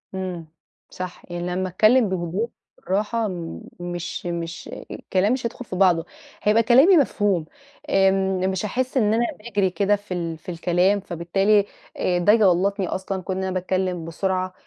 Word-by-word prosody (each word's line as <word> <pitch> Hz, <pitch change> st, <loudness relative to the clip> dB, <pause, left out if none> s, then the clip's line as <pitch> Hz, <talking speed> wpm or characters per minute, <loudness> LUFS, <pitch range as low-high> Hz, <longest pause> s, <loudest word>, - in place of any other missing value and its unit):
إمم، 180 Hz, -4 st, -5 dB, 0.4 s
صح، 185 Hz, -1 st, -7 dB
يعني 175 Hz, 0 st, -3 dB
لمّا 185 Hz, +1 st, -2 dB
أتكلّم 215 Hz, +4 st, +4 dB
بهدوء، 185 Hz, +5 st, -2 dB, 0.3 s
بالراحه 215 Hz, +4 st, -1 dB, 0.5 s
مش 175 Hz, 0 st, -5 dB
مش 170 Hz, -1 st, -4 dB, 0.2 s
الكلام 195 Hz, +5 st, 0 dB
مش 250 Hz, -2 st, -3 dB
هيدخل 240 Hz, +2 st, -5 dB
في 185 Hz, -, -6 dB
بعضه، 180 Hz, -3 st, +3 dB, 0.4 s
هيبقى 215 Hz, +2 st, +4 dB
كلامي 270 Hz, -, +6 dB
مفهوم، 205 Hz, -, +1 dB, 0.4 s
آمم، 190 Hz, -1 st, +2 dB
مش 190 Hz, +2 st, -2 dB
هاحس 255 Hz, +5 st, -2 dB
إن 215 Hz, -3 st, +3 dB
أنا 235 Hz, +2 st, +2 dB
باجري 205 Hz, -4 st, 0 dB
كده 200 Hz, +2 st, +2 dB
في 205 Hz, -2 st, -7 dB
ال 165 Hz, -2 st, -3 dB
في 180 Hz, -, -12 dB
الكلام 180 Hz, +4 st, +2 dB
فبالتالي 195 Hz, +4 st, +1 dB, 0.5 s
ده 175 Hz, +4 st, +4 dB
يغلطني 195 Hz, -2 st, +3 dB
أصلًا 190 Hz, 0 st, -3 dB
كون 185 Hz, +1 st, -3 dB
إن 190 Hz, -, -2 dB
أنا 190 Hz, -, -2 dB
باتكلم 185 Hz, -2 st, -1 dB
بسرعة. 185 Hz, +2 st, -2 dB
190 Hz, 150 wpm, -23 LUFS, 175-210 Hz, 0.5 s, كلامي